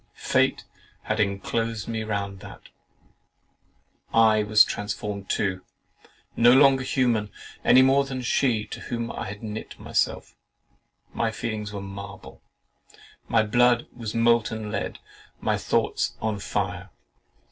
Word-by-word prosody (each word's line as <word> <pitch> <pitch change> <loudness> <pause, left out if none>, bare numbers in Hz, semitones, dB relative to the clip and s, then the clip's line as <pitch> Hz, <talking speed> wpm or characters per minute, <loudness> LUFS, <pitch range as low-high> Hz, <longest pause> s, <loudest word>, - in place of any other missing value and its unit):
Fate - - +1 0.4
had 110 +1 -2
enclosed 105 +2 -1
me 110 -1 -3
round 100 -3 -4
about. - - -12 1.4
I 110 -1 +5
was 105 0 +6
transformed 105 -1 -5
too, 95 -2 -1 0.7
no 120 +1 +6
longer 135 0 +6
human 120 -5 0 0.3
(any 130 +1 +7
more 135 +1 +4
than 130 -2 -5
she, 120 -3 +1
to - - -8
whom 115 -1 -4
I - - -5
had 105 +2 -8
knit 110 0 -7
myself) - - -1 0.8
my 115 - 0
feelings 110 -2 -4
were 100 -1 -5
marble; 100 0 -9 0.9
my 110 -1 +3
blood 120 +2 +3
was 115 -3 -6
of 115 - +1
molten 115 -2 +1
lead; - - -3 0.4
my - - 0
thoughts - - 0
on 110 -2 -2
fire. - - -3
110 Hz, 125 wpm, -25 LUFS, 105-120 Hz, 1.4 s, any